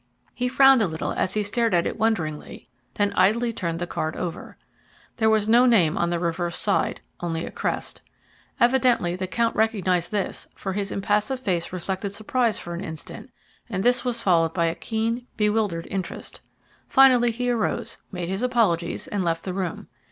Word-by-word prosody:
He 250 - -1
frowned 270 0 +6
a 205 - +2
little 160 -1 -3
as 185 - -1
he 210 - +1
stared 225 0 +1
at 170 - +2
it - - -2
wonderingly, 165 -10 -2 0.3
then 205 -1 +1
idly 230 +4 +2
turned 170 -5 -3
the 175 - -2
card 155 -2 -3
over. 175 -2 -6 0.6
There 220 -2 +3
was 215 -1 +2
no 240 +3 +6
name 180 -10 +4
on 170 - 0
the 175 - 0
reverse 170 0 -2
side 200 - 0 0.2
only 165 -1 -3
a - - -7
crest. - - -3 0.6
Evidently 240 -8 +3
the 185 0 -4
count 230 +4 0
recognized 190 -6 +1
this, 205 -3 -2
for 190 - -4
his 200 0 -2
impassive 210 +6 0
face 180 -8 -1
reflected 190 +2 -4
surprise 225 +2 0
for 170 - -6
an 170 - -5
instant, 160 -3 -8 0.4
and 190 -3 -2
this 245 0 +3
was 240 -2 -1
followed 165 -3 +3
by 170 -2 +2
a 165 - +1
keen, 230 +5 -3
bewildered 210 -5 0
interest. 190 -2 -5 0.5
Finally 255 -3 +6
he 245 +2 -1
arose, 230 0 -2
made 180 -3 -4
his 190 +3 -3
apologies, 215 -10 +1
and 200 -2 -2
left 165 -1 -1
the 185 - -4
room. 185 -3 -4
205 Hz, 180 wpm, -24 LUFS, 175-230 Hz, 0.6 s, frowned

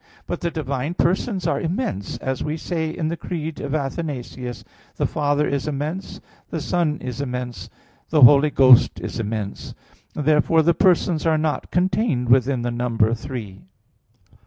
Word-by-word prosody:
But - - -4
the 170 - 0
divine 145 0 -3
persons 185 +2 0
are 170 - 0
immense, 165 - -3
as 130 -1 -3
we 155 +1 -2
say 160 -1 -2
in 160 0 -3
the 170 - -2
Creed 160 -2 -5
of 140 +1 -3
Athanasius: 135 -4 -4 0.3
"The - - 0
Father 145 0 0
is 140 +1 -2
immense, 150 +6 -4 0.3
the 165 - -3
Son 155 -1 0
is 125 +1 -5
immense, 125 -2 -5 0.4
the 155 -2 +2
Holy 140 +4 +8
Ghost 130 -3 +5
is - - -5
immense." 105 -2 -4 0.4
Therefore 155 +2 +3
the 170 +2 +4
persons 175 -3 +2
are 160 -1 +3
not 155 -3 -2
contained 180 - 0
within 130 0 +3
the 120 - -1
number 115 -2 +1
three. 110 -5 -6
145 Hz, 155 wpm, -22 LUFS, 125-165 Hz, 0.4 s, Holy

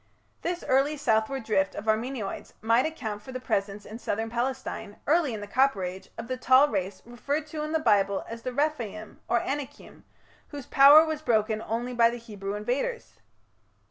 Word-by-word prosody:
This 350 0 -3
early 275 +3 +2
southward 225 0 0
drift 195 -3 0
of 205 - -6
Armenoids 220 -1 -2
might 230 +5 +3
account 220 -10 -5
for 235 - -10
the 255 - -5
presence 200 -4 -2
in 220 +2 -9
southern 225 -1 -3
Palestine, 245 -4 -3
early 310 -2 +2
in 215 -2 -5
the 205 - -7
Copper 255 -3 +2
Age, 185 +1 -6
of 230 0 -6
the 255 - -3
tall 260 +3 +5
race 190 -2 -3
referred 280 +6 -3
to 310 - -5
in 305 0 -3
the 320 - +2
Bible 200 -8 +2
as 230 0 -7
the 255 - -4
Rephaim 240 -7 -3
or 235 - +2
Anakim, 285 0 -6 0.4
"whose 285 -4 -8
power 290 +3 +8
was 315 -1 -3
broken 220 -4 +1
only 235 +3 -3
by 230 -1 +5
the 240 - -5
Hebrew 205 -4 -6
invaders". 260 - -3
235 Hz, 180 wpm, -27 LUFS, 215-275 Hz, 0.4 s, power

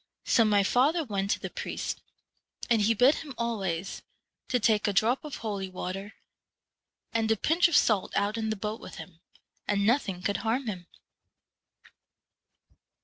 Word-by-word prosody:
So 230 - +4
my 205 -2 +3
father 285 - +3
went 200 -6 -2
to - - +1
the - - -6
priest, - - -4 0.7
and 225 -2 +4
he 225 +2 +3
bid 250 +7 +5
him 285 -5 -8
always 195 -7 -2 0.5
to 250 - +1
take 215 -1 +2
a 205 - +1
drop 230 +7 +2
of 300 -2 -6
holy 200 -4 -4
water 190 +3 -6 1.0
and 225 -1 +1
a 225 - +3
pinch 330 - +3
of 340 - +3
salt 210 -4 +2
out 205 +2 +1
in 220 -1 -2
the 220 - 0
boat 210 +2 -4
with - - -10
him, 165 -4 -11 0.5
and 200 -1 +1
nothing 205 -6 +1
could 200 - 0
harm 240 +4 -1
him.' 185 -6 -5
215 Hz, 160 wpm, -28 LUFS, 200-235 Hz, 1.0 s, bid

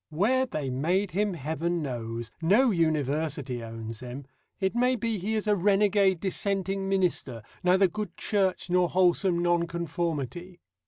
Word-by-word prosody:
Where 235 +12 +2
they 145 - -3
made 180 +9 0
him 205 0 0
Heaven 160 +3 -2
knows. 115 -3 -5
No 220 +10 +4
university 150 - -1
owns 115 0 -7
him. 125 +2 -8 0.3
It 190 -1 0
may 250 +2 +2
be 230 -2 -2
he 215 +5 -2
is 215 - -1
a 210 - +4
renegade 195 -1 +3
Dissenting 195 0 -1
minister, 175 - 0 0.2
neither 185 +2 +5
good 210 +1 -6
Church 195 -4 0
nor 180 -1 +3
wholesome 180 0 +3
Nonconformity. 170 -1 -2
175 Hz, 140 wpm, -27 LUFS, 150-195 Hz, 0.3 s, neither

